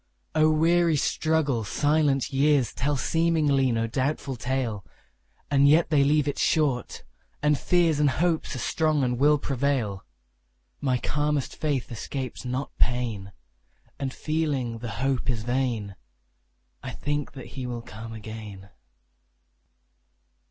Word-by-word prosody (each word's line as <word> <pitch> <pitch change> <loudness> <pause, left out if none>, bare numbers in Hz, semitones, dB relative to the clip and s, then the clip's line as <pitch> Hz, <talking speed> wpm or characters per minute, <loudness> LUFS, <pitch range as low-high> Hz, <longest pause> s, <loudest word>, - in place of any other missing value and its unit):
O 155 0 +4
weary 165 +1 +3
struggle! 145 -5 +1
silent 145 +2 +1
years 140 -3 +3
Tell 145 +2 0
seemingly 150 -4 +2
no 115 -1 0
doubtful 135 +3 -2
tale; 120 -5 -2 0.7
And 140 0 +5
yet 155 +3 +4
they 145 -2 +5
leave 145 +1 +2
it 145 - -2
short, 140 -6 0 0.4
and 150 0 +4
fears 165 0 +2
And 150 -1 +4
hopes 160 +2 0
are - - -4
strong 155 +1 +1
and 125 -1 0
will 150 +2 +5
prevail. 130 -8 -1 0.8
My 130 -3 +1
calmest 145 +1 -1
faith 140 -5 -2
escapes 130 +3 -5
not 125 +3 -3
pain; 115 -5 0 0.7
And, 135 -1 -2
feeling 150 -5 -1
that 115 - -9
the 120 - -4 0.2
hope 135 -1 0
is 115 -4 -1
vain, 120 -5 -1 0.9
I 130 - -6
think 145 -1 -3
that 135 -3 -9
he 130 -2 -5
will 120 -1 -5
come 115 0 -9
again. 110 -3 -9
135 Hz, 130 wpm, -26 LUFS, 120-150 Hz, 0.9 s, And